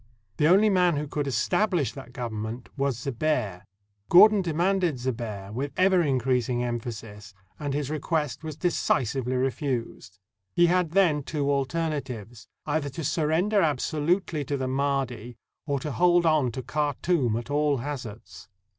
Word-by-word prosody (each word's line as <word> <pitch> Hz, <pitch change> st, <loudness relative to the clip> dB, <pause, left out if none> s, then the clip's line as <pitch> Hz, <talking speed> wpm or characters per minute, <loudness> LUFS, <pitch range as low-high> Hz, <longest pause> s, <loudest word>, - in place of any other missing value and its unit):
The 150 Hz, -, +3 dB
only 200 Hz, +5 st, +5 dB
man 180 Hz, -3 st, +3 dB
who 145 Hz, +1 st, -2 dB
could 145 Hz, 0 st, -3 dB
establish 155 Hz, -, +1 dB
that 135 Hz, -3 st, -10 dB
government 115 Hz, -1 st, -5 dB
was 140 Hz, -3 st, 0 dB
Zebehr. 120 Hz, -6 st, -1 dB, 0.5 s
Gordon 205 Hz, +3 st, +7 dB
de 175 Hz, -3 st, -2 dB
manded 175 Hz, -2 st, +1 dB
Zebehr 115 Hz, -6 st, -4 dB
with 135 Hz, +4 st, -3 dB
ever 185 Hz, -1 st, +4 dB
increasing 125 Hz, -4 st, 0 dB
emphasis, 110 Hz, -4 st, -6 dB, 0.2 s
and 145 Hz, -2 st, -2 dB
his 145 Hz, -1 st, -2 dB
request 155 Hz, -1 st, -2 dB
was 155 Hz, -2 st, -6 dB
decisively 130 Hz, -, 0 dB
refused. 125 Hz, -, -3 dB, 0.4 s
He 175 Hz, -, +5 dB
had 175 Hz, -2 st, +1 dB
then 175 Hz, -7 st, +3 dB
two 145 Hz, 0 st, -1 dB
alter 140 Hz, +4 st, 0 dB
natives 120 Hz, -7 st, -6 dB
— -, -, -57 dB
either 145 Hz, -1 st, -1 dB
to 150 Hz, +5 st, -6 dB
surrender 165 Hz, +7 st, +1 dB
absolutely 155 Hz, +2 st, 0 dB
to 140 Hz, -, -2 dB
the 130 Hz, -1 st, -2 dB
Mahdi, 130 Hz, -4 st, -2 dB, 0.3 s
or 140 Hz, -2 st, 0 dB
to 150 Hz, -, -4 dB
hold 175 Hz, +2 st, +3 dB
on 155 Hz, -6 st, +3 dB
to 130 Hz, -, -5 dB
Khartoum 145 Hz, -1 st, 0 dB
at 120 Hz, +4 st, -6 dB
all 145 Hz, -1 st, +2 dB
hazards. 120 Hz, -6 st, -7 dB
140 Hz, 150 wpm, -26 LUFS, 125-160 Hz, 0.5 s, Gordon